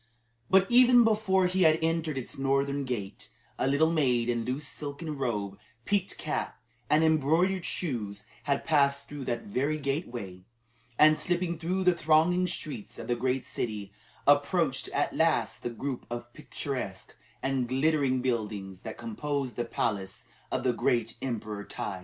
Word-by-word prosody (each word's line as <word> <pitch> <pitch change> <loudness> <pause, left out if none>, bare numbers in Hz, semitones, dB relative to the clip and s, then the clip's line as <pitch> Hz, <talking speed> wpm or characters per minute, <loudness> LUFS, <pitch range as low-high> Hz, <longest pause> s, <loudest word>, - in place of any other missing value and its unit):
But 190 0 +6
even 245 0 +7
before 210 -4 +3
he 185 +1 +1
had 160 -2 +6
entered 160 -3 0
its 130 - -4
northern 140 +1 0
gate, 110 -7 -5 0.3
a - - +1
little 150 +4 +3
maid 125 -7 +2
in 120 -1 0
loose 130 +5 -3
silken 150 +1 -5
robe, 105 -7 -2 0.3
peaked 200 -2 0
cap, 155 - -3 0.3
and 155 +1 +4
embroidered 160 +4 +2
shoes 105 - -3 0.2
had 140 -1 0
passed 140 -3 +2
through 145 -2 -7
that 120 -1 -2
very 140 +9 -1
gateway, 125 - -4 0.6
and 155 0 +6
slipping 175 -2 0
through 185 +3 -1
the 180 -1 +5
thronging 170 +3 +3
streets 150 - -5
of - - -6
the 120 - 0
great 130 +1 -1
city, 105 -6 -4 0.3
approached 145 +1 +3
at - - -1
last - - +1
the - - -2
group 125 +2 -5
of 120 0 -6
picturesque 130 -10 -5 0.3
and 135 -2 0
glittering 135 -1 +2
buildings 105 -6 -2
that 110 - -7
composed 145 - -3
the 120 - -2
palace 100 -5 -2 0.3
of 130 - -1
the 125 -2 +2
great 115 -1 0
Emperor 110 -5 -4
Tai. 95 -2 -5
140 Hz, 150 wpm, -29 LUFS, 120-160 Hz, 0.6 s, even